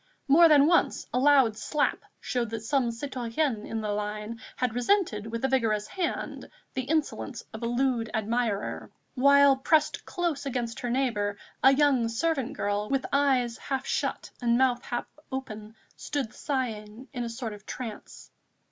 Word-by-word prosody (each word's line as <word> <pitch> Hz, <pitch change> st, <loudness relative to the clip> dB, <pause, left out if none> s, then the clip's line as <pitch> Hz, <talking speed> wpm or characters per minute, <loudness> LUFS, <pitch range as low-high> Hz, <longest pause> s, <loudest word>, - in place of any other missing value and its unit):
More 330 Hz, +5 st, +7 dB
than 290 Hz, -2 st, +7 dB
once 340 Hz, +2 st, +2 dB
a 250 Hz, -, +2 dB
loud 270 Hz, -5 st, +5 dB
slap 295 Hz, +6 st, 0 dB, 0.2 s
showed 240 Hz, -3 st, -2 dB
that 225 Hz, 0 st, -5 dB
some 250 Hz, +1 st, +1 dB
citoyenne 240 Hz, -1 st, -2 dB
in 225 Hz, -, -3 dB
the 210 Hz, -1 st, -2 dB
line 210 Hz, +2 st, -4 dB
had 250 Hz, -3 st, -1 dB
resented 245 Hz, -, +1 dB
with 230 Hz, +3 st, -2 dB
a -, -, +4 dB
vigorous 225 Hz, -6 st, +1 dB
hand 370 Hz, -3 st, -3 dB, 0.2 s
the 260 Hz, -, -2 dB
insolence 290 Hz, -4 st, -2 dB
of 220 Hz, -, -7 dB
a 235 Hz, -, -1 dB
lewd 240 Hz, -2 st, 0 dB
admirer, 220 Hz, -1 st, -1 dB, 0.2 s
while, 280 Hz, +1 st, +6 dB
pressed 300 Hz, +3 st, +2 dB
close 345 Hz, -6 st, -2 dB
against 245 Hz, -4 st, -3 dB
her 245 Hz, -, -3 dB
neighbour, 225 Hz, -6 st, 0 dB, 0.3 s
a 265 Hz, -, +8 dB
young 270 Hz, -5 st, +3 dB
servant 270 Hz, +1 st, -1 dB
girl, 205 Hz, +1 st, -1 dB
with 270 Hz, -1 st, 0 dB
eyes 260 Hz, -4 st, +2 dB
half 270 Hz, -2 st, -3 dB
shut -, -, -2 dB
and 235 Hz, -1 st, +3 dB
mouth 250 Hz, -2 st, +2 dB
half 240 Hz, -, -3 dB, 0.3 s
open, 220 Hz, -5 st, -6 dB, 0.2 s
stood 275 Hz, -7 st, -3 dB
sighing 235 Hz, -3 st, -4 dB
in 245 Hz, -2 st, -3 dB
a 235 Hz, -, -3 dB
sort 230 Hz, -1 st, -5 dB
of 210 Hz, 0 st, -13 dB
trance. 230 Hz, -5 st, -8 dB
245 Hz, 160 wpm, -28 LUFS, 225-275 Hz, 0.3 s, a